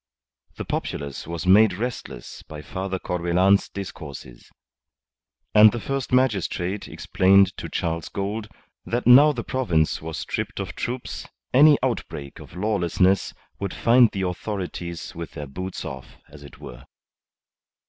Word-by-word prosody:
The - - -6
populace 70 0 -4
was 85 +1 -5
made 100 +2 +6
restless 115 +5 -6
by 75 -1 -10
Father 95 +4 -4
Corbelan's 90 +3 +2
discourses. 75 -10 -9 1.0
And 105 0 +8
the 120 - -4
first 135 +3 -3
magistrate 100 -6 0
explained 95 0 +3
to - - -6
Charles 85 0 -3
Gould 105 +2 -4 0.4
that 120 +1 -2
now 140 +5 +8
the - - -4
province 85 -12 0
was 80 0 -6
stripped - - -4
of - - -4
troops 120 +1 -5 0.3
any 145 +3 +7
outbreak 75 - -4
of - - -13
lawlessness 95 -1 +1 0.2
would 100 -2 -4
find 120 0 +5
the 95 -1 -4
authorities 90 -2 -5
with 85 0 -7
their 75 -2 -6
boots 90 +7 -6
off, 65 -2 -8
as 75 0 -14
it 70 - -13
were. - - -11
95 Hz, 135 wpm, -24 LUFS, 85-110 Hz, 1.0 s, And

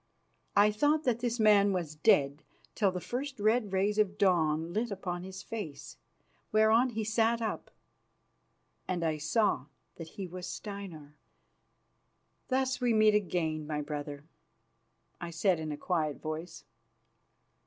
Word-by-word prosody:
I 205 +1 +6
thought 295 +8 +2
that 245 -4 +1
this 240 0 -2
man 205 -2 +5
was 170 -5 -2
dead 150 -4 +3 0.3
till 200 -4 +2
the 180 - -4
first 265 +6 -5
red 215 0 +2
rays 200 +2 +1
of 205 -1 +1
dawn 165 -4 +2
lit 230 +3 0
upon 180 -3 -4
his 190 +1 -8
face, 205 -11 -7 0.5
whereon 220 +4 +4
he 225 -2 -3
sat 225 +2 +2
up, 225 -1 -3 1.2
and 175 -2 -1
I 155 -1 0
saw 155 - +1 0.3
that 165 - -7
he 195 - -3
was 180 0 -7
Steinar. 190 -8 -7 1.3
"Thus 260 0 0
we 240 -2 +2
meet 215 0 +5
again, 165 -6 0
my 150 -1 -2
brother," 145 -1 -6 1.0
I 175 - -5
said 170 +1 +1
in 155 -1 -4
a 145 - -4
quiet 155 -3 -1
voice. 160 +2 -6
195 Hz, 140 wpm, -31 LUFS, 160-220 Hz, 1.3 s, I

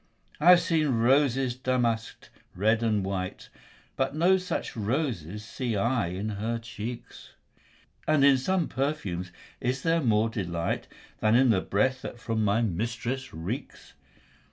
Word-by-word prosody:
I 160 +4 +5
have 180 -1 +8
seen 155 -6 +1
roses 130 +1 +3
damask'd, 120 -3 -1 0.3
red 110 +5 +2
and 105 -4 +1
white, 95 -1 -4 0.5
But 135 +2 -1
no 175 +4 +4
such 185 -1 -4
roses 105 - -2
see 120 0 -3
I 120 +1 +1
in 95 +5 -3
her 110 +3 -2
cheeks; 115 +1 -8 0.7
And 155 -3 +4
in 140 -2 +6
some 185 +5 0
perfumes 105 - -3 0.3
is 130 +1 -2
there 165 0 +2
more 110 -4 +3
delight 85 -6 -3 0.3
Than 110 +1 +3
in 130 0 +5
the 95 -4 +2
breath 130 +8 0
that - - -7
from 115 -1 -1
my 105 +3 +2
mistress 115 +6 -3
reeks. 95 - -6
115 Hz, 140 wpm, -27 LUFS, 105-135 Hz, 0.7 s, have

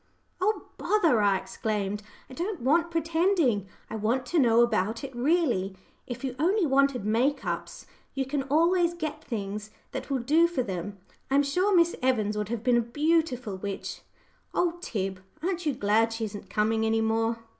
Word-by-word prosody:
"Oh, 425 +3 +1 0.2
bother!" 335 - +3
I 200 -2 +4
exclaimed, 205 0 -3 0.3
"I - - -12
don't 355 +5 -3
want 330 +7 +3
pretending. 330 - +1 0.2
I - - -6
want 235 +5 0
to 340 +4 +1
know 235 -3 +5
about 220 0 0
it 270 -2 -7
really. 240 - +1 0.3
If 245 0 -6
you 260 -2 -3
only 370 +5 +3
wanted 275 -5 +2
make 245 +5 +1
ups, 170 -1 -4 0.3
you 270 -1 0
can 275 +1 -1
always 340 +3 +3
get 310 -2 -4
things 210 -3 -4 0.2
that - - -5
will 275 - +1
do 305 +8 +4
for 340 -7 -1
them. 195 0 -5 0.3
I 270 - +2
am 285 - +5
sure 365 +8 +2
Miss 340 0 +4
Evans 220 -5 +1
would 210 -1 -2
have 230 -1 -3
been 245 -2 +4
a - - +4
beautiful 255 - 0
witch! 195 +1 -5 0.5
Oh, 345 -1 +1
Tib, 195 - -3 0.2
aren't 355 -2 -1
you 285 - +1
glad 220 +3 +2
she 225 0 -2
isn't 205 -2 -8
coming 220 +2 +1
any 225 0 +2
more?" 225 +1 +1
250 Hz, 175 wpm, -27 LUFS, 215-320 Hz, 0.5 s, know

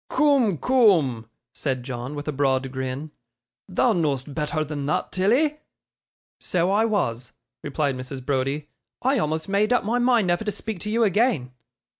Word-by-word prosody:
'Coom, 270 - +3
coom,' 160 - +3 0.2
said 130 -4 -2
John, 125 +2 -5
with 145 +1 -6
a - - 0
broad 135 -2 0
grin; 130 +3 -4 0.6
'thou 220 +5 +2
know'st 145 -5 -1
betther 155 0 -1
than 145 -2 -4
thot, 150 - -1
Tilly.' 260 +11 +2 0.8
'So 180 +1 0
I 215 +3 +3
was,' 125 - -1 0.3
replied 145 -1 -1
Mrs. 130 0 -7
Browdie. 140 +2 -1 0.4
'I 265 0 +2
almost 160 -1 -1
made 205 +3 +1
up 245 - +3
my 230 +4 0
mind 240 -4 +3
never 175 +3 +1
to 210 - -1
speak 210 0 -5
to 210 - -5
you 230 +2 +2
again. 205 - +1
155 Hz, 160 wpm, -24 LUFS, 135-220 Hz, 0.8 s, Coom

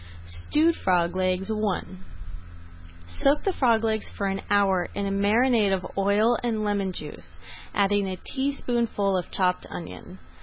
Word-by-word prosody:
STEWED 295 - +1
FROG 175 -1 +1
LEGS 185 +2 0
I 215 -3 -1 1.2
Soak 275 - +2
the 390 - 0
frog 230 -7 +2
legs 220 -1 -1
for 200 - -4
an 195 0 -1
hour 195 -3 +2
in 200 - -2
a 195 - -1
marinade 210 +2 +3
of 185 -2 -1
oil 205 +4 +2
and 225 -3 -1
lemon 200 -2 0
juice, - - -8 0.4
adding 200 0 +2
a 185 - -4
teaspoonful 240 -7 -1
of 180 -2 -2
chopped 180 -1 0
onion. 180 +2 -9
200 Hz, 145 wpm, -25 LUFS, 185-225 Hz, 1.2 s, marinade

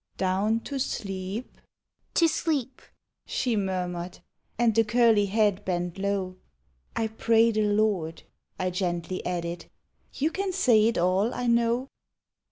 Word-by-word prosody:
" - - -43
Down 195 +4 +1
to 275 +2 -5
sleep 195 -1 -4 0.2
" - - -63
— - - -61
" - - -45
To 335 - +5
sleep," 280 -6 -1 0.5
she 245 -3 0
murmured, 180 -3 -2 0.4
And 235 -1 +3
the 225 +1 +4
curly 225 -2 +4
head 205 -1 +1
bent 175 0 -2
low; 195 -2 -2 0.6
"I 225 - 0
pray 225 +1 +3
the 215 -1 +1
Lord," 205 -6 0 0.3
I 185 0 -1
gently 180 0 -2
added; 170 -1 -3 0.5
4* - - -12
You 310 +3 +2
can 385 +1 -2
say 230 - +4
it 230 - 0
all, 185 +5 +2
1 245 -1 0
know." 235 +2 +1
210 Hz, 155 wpm, -27 LUFS, 185-235 Hz, 0.6 s, To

